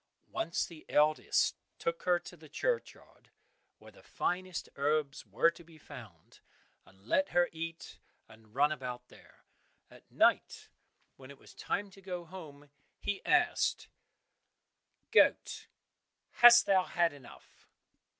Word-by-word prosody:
Once 195 -6 -1
the 165 -3 -13
eldest 150 +1 +2 0.2
took 170 0 -3
her 180 -1 +4
to 175 +1 -11
the 155 -2 -16
churchyard, 480 - -4 0.5
where - - -16
the - - -19
finest 185 0 -3
herbs 145 -3 -1
were 115 +12 +3
to 170 - -15
be 165 -1 -18
found, 115 - -14 0.5
and 95 +1 -22
let 285 - +1
her 175 0 +2
eat 165 0 -8 0.3
and 110 0 -19
run 145 +2 +3
about 125 -4 -6
there. - - -20 0.5
At - - -18
night - - +1 0.5
when 130 0 -13
it 140 - -12
was - - -17
time 200 0 -3
to 195 - -16
go 180 -2 -6
home 150 -5 -12 0.3
he 205 - -3
asked, 350 -1 +1 1.2
"Goat, - - +3 0.6
hast 240 0 +8
thou 190 -2 +3
had 170 -3 +1
enough?" 140 -4 -17
160 Hz, 130 wpm, -32 LUFS, 140-180 Hz, 1.2 s, hast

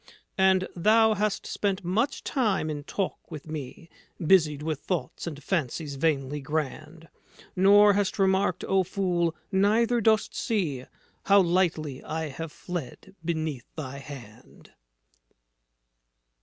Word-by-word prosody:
And 190 -1 +4
thou 220 +5 +4
hast 210 0 -1
spent 200 -1 -2
much 220 +11 0
time 210 - 0
in 145 -1 -5
talk 195 +3 -4
with 150 0 -9
me 155 +1 -7 0.3
Busied 155 -4 +3
with 155 -2 -2
thoughts 175 0 -4
and 150 -3 -6
fancies 155 -3 -2
vainly 145 -1 -1
grand, 155 +2 -4 0.5
Nor 205 +2 +6
hast 205 0 0
remarked, 190 -1 +2
O 195 0 +2
fool, 175 -3 0 0.2
neither 220 +5 +3
dost 220 0 +2
see 155 - -2 0.4
How 200 0 +6
lightly 170 -6 +1
I 160 -1 -3
have 160 +3 -6
fled 175 +3 -7
beneath 160 -6 -3
thy 140 -3 -6
hand." 130 -6 -12
170 Hz, 120 wpm, -27 LUFS, 150-195 Hz, 0.5 s, Nor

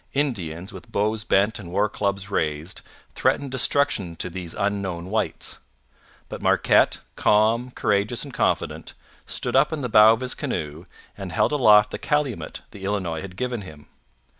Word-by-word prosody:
Indians, 95 - -2
with 95 -3 -11
bows 105 +1 0
bent 105 +1 +2
and 85 -4 -9
war 100 +3 +2
clubs 100 -1 -3
raised, 80 -1 -2 0.3
threatened 140 -2 0
destruction 130 -9 +1
to 90 - -3
these 90 -2 -5
unknown 95 -3 -2
whites; 110 0 -2 0.7
but - - -7
Marquette, - - +3 0.2
calm, 110 +4 +3
courageous, 105 -1 0
and - - -9
confident, - - -1 0.3
stood - - -2
up 135 +4 +4
in 155 -2 -3
the 125 - -3
bow 110 0 +8
of 115 +2 0
his 130 -1 0
canoe 85 - -4 0.3
and 95 -3 -7
held 105 - +2
aloft 105 -7 +5
the - - -5
calumet 145 -5 -2
the 100 - -11
Illinois 95 -5 -2
had 95 -1 -9
given 125 -2 -2
him. 75 -6 -12
105 Hz, 160 wpm, -24 LUFS, 90-120 Hz, 0.7 s, bow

